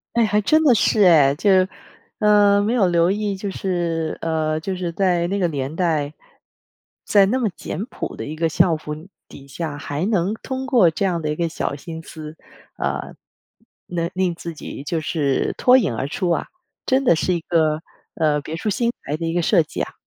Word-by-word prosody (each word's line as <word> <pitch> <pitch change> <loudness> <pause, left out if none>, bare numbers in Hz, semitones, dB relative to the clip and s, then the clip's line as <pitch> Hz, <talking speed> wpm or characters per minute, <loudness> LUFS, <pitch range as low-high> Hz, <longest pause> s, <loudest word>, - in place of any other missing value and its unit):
哎， 235 -1 +4
还 210 0 +1
真 310 +9 +3
的 250 -5 +6
是 210 0 +3
哎。 150 -6 +6
就， 200 +6 +1 0.7
呃， 205 -1 +5
没 220 +4 0
有 205 -7 +3
留 170 0 +3
意， 205 0 -1
就 200 +1 -4
是 170 -4 -2
呃， 155 -1 -1
就 190 +4 -4
是 180 -2 -3
在 175 -2 +1
那 200 +2 -1
个 175 - +2
年 140 -2 -3
代， 155 -4 0 0.9
在 200 -2 +5
那 255 +5 0
么 225 -4 +1
简 195 +6 -5
朴 - - -6
的 - - -5
一 155 +2 -6
个 165 0 0
校 170 +1 +3
服 150 -1 -6 0.4
底 140 0 -13
下， 145 +1 -5
还 145 +4 -3
能 200 -2 +1
通 265 0 -4
过 235 - +4
这 195 +5 -1
样 175 -3 0
的 155 - -2
一 150 - -1
个 170 -1 0
小 145 - -3
心 160 +2 -8
思， 155 0 -9 0.4
呃， - - -3 0.7
能 170 -1 -2
令 180 -2 0
自 170 0 -7
己 145 - -8
就 160 +3 -2
是 150 -3 0
脱 255 +1 +6
颖 155 - 0
而 130 - -2
出 180 +2 -2
啊， - - -1 0.4
真 265 +1 +2
的 170 - +5
是 180 +3 0
一 170 - 0
个， 160 -1 +1 0.3
呃， 150 -3 +1
别 160 +3 -6
出 210 - -2
心 235 +4 0
裁 150 - -2
的 165 +1 -4
一 165 - -1
个 175 - +1
设 170 -1 +3
计 - - -8
啊。 - - -4
170 Hz, 220 characters per minute, -21 LUFS, 155-200 Hz, 0.9 s, 的